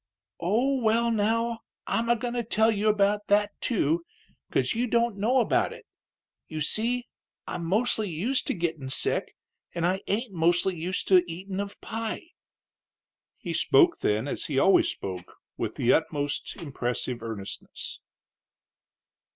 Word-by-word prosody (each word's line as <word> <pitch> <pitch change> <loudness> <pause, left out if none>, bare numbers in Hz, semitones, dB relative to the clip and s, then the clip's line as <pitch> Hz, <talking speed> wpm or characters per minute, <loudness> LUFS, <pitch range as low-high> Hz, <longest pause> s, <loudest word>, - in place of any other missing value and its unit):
"Oh, 245 +9 +1
well, 230 +1 +3
now, 230 +2 +1 0.3
I'm 230 +1 0
a 235 - +5
goin' 240 +1 -3
to 240 -1 -1
tell 220 0 +3
you 210 0 0
about 205 0 +2
that, 205 0 +3
too, 170 - +1 0.5
'cause 130 -1 +1
you 240 +2 0
don't 235 -1 +2
know 245 +6 +3
about - - +1
it. - - -13 0.6
You 155 - -5
see, 235 - 0 0.4
I'm 170 - -4
mostly 215 +2 +1
used 225 - -1
to - - 0
gittin' 165 -6 -2
sick, 130 - +1 0.4
an' 170 -1 0
I 185 +2 +1
ain't 215 +1 -1
mostly 175 +2 +2
used 175 +3 -2
to 185 -2 +7
eatin' 190 +3 -5
of 200 0 -4
pie." 225 +8 -4 1.1
He - - -5
spoke 345 -2 +4
then, 105 +5 0
as - - -3
he 140 - -2
always 190 +8 +5
spoke, 90 -2 -6 0.2
with - - -3
the 125 +7 +4
most 145 -1 -3
impressive 125 -6 -3
earnestness. 110 -4 -6
200 Hz, 145 wpm, -27 LUFS, 165-230 Hz, 1.1 s, to